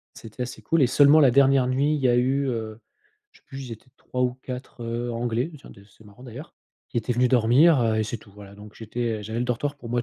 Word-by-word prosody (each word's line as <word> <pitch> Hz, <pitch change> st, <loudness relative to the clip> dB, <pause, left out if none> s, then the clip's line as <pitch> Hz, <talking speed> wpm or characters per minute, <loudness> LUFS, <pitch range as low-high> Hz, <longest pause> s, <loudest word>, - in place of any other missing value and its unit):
C'était 115 Hz, +3 st, -8 dB
assez 125 Hz, +2 st, -7 dB
cool, 165 Hz, -3 st, +1 dB
et -, -, +5 dB
seulement 145 Hz, +4 st, +5 dB
la 135 Hz, -4 st, +6 dB
dernière 135 Hz, 0 st, +4 dB
nuit 140 Hz, +4 st, +1 dB
il 150 Hz, -, -2 dB
y 130 Hz, -, +2 dB
a 120 Hz, -, +3 dB
eu, 135 Hz, +3 st, +1 dB
heu, 110 Hz, -2 st, -5 dB, 0.5 s
je 445 Hz, -, -23 dB
sais -, -, -46 dB
plus, 135 Hz, -1 st, -8 dB
ils -, -, -7 dB
étaient 115 Hz, +3 st, -13 dB
3 125 Hz, -, -4 dB
ou 125 Hz, -1 st, 0 dB
4 125 Hz, -1 st, -8 dB
heu 120 Hz, +1 st, -3 dB
anglais, 120 Hz, +5 st, -2 dB
tiens -, -, -15 dB
des 100 Hz, -, -16 dB
c’est 105 Hz, +2 st, -22 dB
marrant 105 Hz, +4 st, -17 dB
d'ailleurs 130 Hz, +7 st, -10 dB, 0.3 s
qui -, -, -8 dB
étaient 120 Hz, +2 st, -1 dB
venus 125 Hz, +1 st, +2 dB
dormir, 130 Hz, +5 st, +4 dB
heu 110 Hz, -1 st, +1 dB
et 110 Hz, -, 0 dB
c'est 115 Hz, -, -4 dB
tout, 100 Hz, -1 st, -19 dB
voilà. 100 Hz, -1 st, -13 dB
Donc 105 Hz, +1 st, -14 dB
j'étais, 115 Hz, 0 st, -4 dB
heu, -, -, -9 dB
j'avais 110 Hz, +3 st, -5 dB
le -, -, 0 dB
dortoir 135 Hz, +4 st, -2 dB
pour 120 Hz, -4 st, -11 dB
moi 120 Hz, -1 st, 0 dB
120 Hz, 270 wpm, -24 LUFS, 115-135 Hz, 0.5 s, la